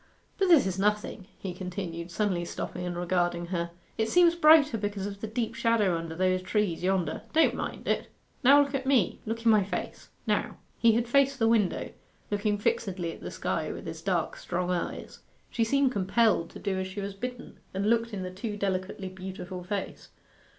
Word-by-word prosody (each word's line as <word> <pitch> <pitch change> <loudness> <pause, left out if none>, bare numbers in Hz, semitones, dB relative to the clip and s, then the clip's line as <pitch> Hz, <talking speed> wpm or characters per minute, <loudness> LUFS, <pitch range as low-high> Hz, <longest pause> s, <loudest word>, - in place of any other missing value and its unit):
'But 385 - +3
this 335 -6 +6
is 190 0 -2
nothing,' 210 -1 0
he 190 -2 -5
continued, 180 -2 -5
suddenly 180 -1 0
stopping 180 +1 -5
and 175 -1 -4
regarding 175 -1 0
her. 170 -1 -1 0.3
'It 220 0 +1
seems 350 +2 +5
brighter 305 -5 +6
because 205 -2 -3
of 200 0 -6
the 220 - -3
deep 225 +1 -2
shadow 220 -6 +2
under 165 -1 -4
those 185 +1 +1
trees 190 -2 0
yonder. 185 -3 0
Don't 325 0 +4
mind - - -5
it; - - 0 0.4
now 280 +3 +8
look 280 0 -6
at 265 -1 -2
me 250 -10 +2
look 230 +1 -3
in 230 - +7
my 210 -2 +5
face 195 - -5 0.2
now.' - - 0 0.2
He 230 -1 +5
had 235 +1 +1
faced 275 +2 +3
the 225 -2 +2
window, 220 -5 +1 0.4
looking 205 0 +1
fixedly 190 -4 -1
at - - -13
the - - -5
sky - - -2
with - - -8
his - - -6
dark - - -1
strong 180 0 -2
eyes. 175 -1 -4 0.3
She 230 - +1
seemed 275 +3 +2
compelled 200 -3 +2
to - - -11
do 190 -1 -2
as 190 - -2
she 190 +2 -7
was 200 0 -4
bidden, 250 +5 -7
and 195 +2 -1
looked 230 +1 +2
in 195 -3 -4
the 185 - -5
too 210 +3 -5
delicately 190 0 -2
beautiful 185 -1 -7
face. 195 +2 -5
200 Hz, 195 wpm, -28 LUFS, 185-230 Hz, 0.4 s, now